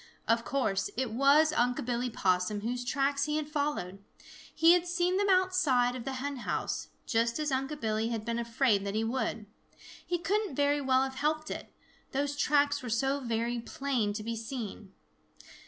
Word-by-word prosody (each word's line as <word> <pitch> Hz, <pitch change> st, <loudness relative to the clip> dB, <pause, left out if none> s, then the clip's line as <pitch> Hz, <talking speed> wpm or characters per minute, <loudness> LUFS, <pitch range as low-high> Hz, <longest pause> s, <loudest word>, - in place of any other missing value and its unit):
Of 230 Hz, +1 st, +2 dB
course 215 Hz, -9 st, 0 dB
it 255 Hz, -3 st, -1 dB
was 285 Hz, +6 st, +4 dB
Unc' 245 Hz, -4 st, +1 dB
Billy 245 Hz, 0 st, -1 dB
Possum 185 Hz, -1 st, 0 dB
whose 245 Hz, +3 st, -2 dB
tracks 275 Hz, +2 st, 0 dB
he 300 Hz, 0 st, -1 dB
had 305 Hz, -1 st, -2 dB
followed. 285 Hz, -11 st, -2 dB, 0.5 s
He 330 Hz, +2 st, +7 dB
had 355 Hz, 0 st, +2 dB
seen 350 Hz, +1 st, +1 dB
them 405 Hz, 0 st, +1 dB
outside 370 Hz, -10 st, +3 dB
of 250 Hz, -2 st, -6 dB
the 270 Hz, -, -3 dB
hen 275 Hz, +2 st, -4 dB
house, 240 Hz, -, -3 dB, 0.2 s
just 230 Hz, 0 st, +1 dB
as 305 Hz, -2 st, -1 dB
Unc' 270 Hz, +3 st, -2 dB
Billy 220 Hz, 0 st, 0 dB
had 225 Hz, -2 st, -3 dB
been 235 Hz, 0 st, -1 dB
afraid 230 Hz, -3 st, +1 dB
that 200 Hz, 0 st, -3 dB
he 220 Hz, -, +1 dB
would. 225 Hz, -2 st, -2 dB, 0.6 s
He 350 Hz, -, -1 dB
couldn't 400 Hz, -1 st, -1 dB
very 285 Hz, +1 st, +2 dB
well 260 Hz, -1 st, +3 dB
have 265 Hz, 0 st, -3 dB
helped 310 Hz, +3 st, -1 dB
it, -, -, -6 dB, 0.4 s
those 285 Hz, +1 st, -1 dB
tracks 285 Hz, 0 st, +2 dB
were 250 Hz, -, -6 dB
so 270 Hz, +5 st, +1 dB
very 235 Hz, -1 st, -1 dB
plain 240 Hz, -3 st, -1 dB
to 215 Hz, +1 st, -5 dB
be 230 Hz, +1 st, -3 dB
seen. 220 Hz, -3 st, -6 dB
260 Hz, 180 wpm, -30 LUFS, 230-290 Hz, 0.6 s, He